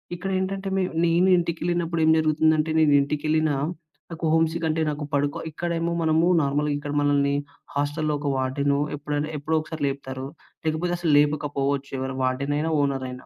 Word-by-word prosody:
ఇక్కడేంటంటే 195 +1 -2
మే 190 - +2 0.2
నేను 170 +3 +3
ఇంటికెళ్ళినప్పుడేం 170 -1 0
జరుగుతుందంటే, 155 0 +2
నేను 155 -2 +4
ఇంటికెళ్ళినా, 155 +1 0 0.6
నాకు 165 0 -4
హోమ్ 165 0 +4
సిక్‌ 170 -1 -3
అంటే 160 +1 0
నాకు 145 0 -5
పడుకో, 145 0 0
ఇక్కడేమో 170 +1 -2
మనమూ 160 +1 +3 0.2
నార్మల్‍గా 145 +1 0
ఇక్కడ 145 0 -5
మనల్ని 140 -1 +2 0.4
హాస్టలులో 145 +2 0
ఒక 145 - -4
వార్డెను 140 +2 0 0.2
ఎప్పుడైనా, 150 +1 -3
ఎప్పుడోకసారి 155 +1 -2
లేపుతారు. 135 -1 -5 0.4
లేకపోతే 160 +3 0
అసలు 170 -3 +1
లేపకపోవచ్చు. 140 -2 0
ఎవరు 130 0 -3
వార్డెనయినా, 140 +5 0
ఓనరయినా. 130 -2 -3
150 Hz, 135 wpm, -24 LUFS, 140-165 Hz, 0.6 s, నేను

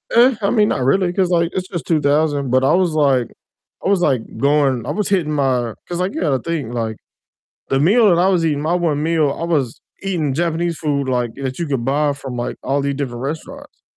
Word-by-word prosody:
Eh, 245 +2 +6
I 200 - +1
mean, 210 -3 +3
not 130 - -1
really 175 +7 +2
'cause 185 -1 +1
like, 170 -1 +2
it's 185 0 -3
just 175 -5 -5
2000, 145 -2 +1
but, 130 +1 +2
I 135 - +3
was 180 -2 +2
like 135 -6 +2 0.6
I - - +2
was 195 -3 +2
like, 135 -8 +2 0.2
going 140 -4 +2
I - - -2
was 210 -1 -1
hitting 180 -6 +1
my 130 -5 0
'cause, 175 0 -4
like, 185 +2 -1
you - - -3
gotta 140 -6 +1
think. 155 -8 -3
like, 110 -2 -3 0.7
the 135 - +1
meal 210 - +4
that 175 -2 +4
I 185 - +4
was 175 -4 +2
eating 145 -3 0
my 160 +3 0
1 160 -5 0
meal, 160 -2 +2
I 165 - -3
was 145 -8 -1 0.2
eating 170 -8 -1
Japanese 170 +1 -1
food, 140 -3 -1
like, 125 -3 -1
that 135 -1 -4
you 170 - -2
could 135 -5 -2
buy 145 +3 +1
from, 135 -3 -7
like, 120 0 -3
all 140 +1 0
these 140 0 -1
different 125 -4 -4
restaurants, 270 - -7
150 Hz, 230 wpm, -19 LUFS, 135-175 Hz, 0.7 s, Eh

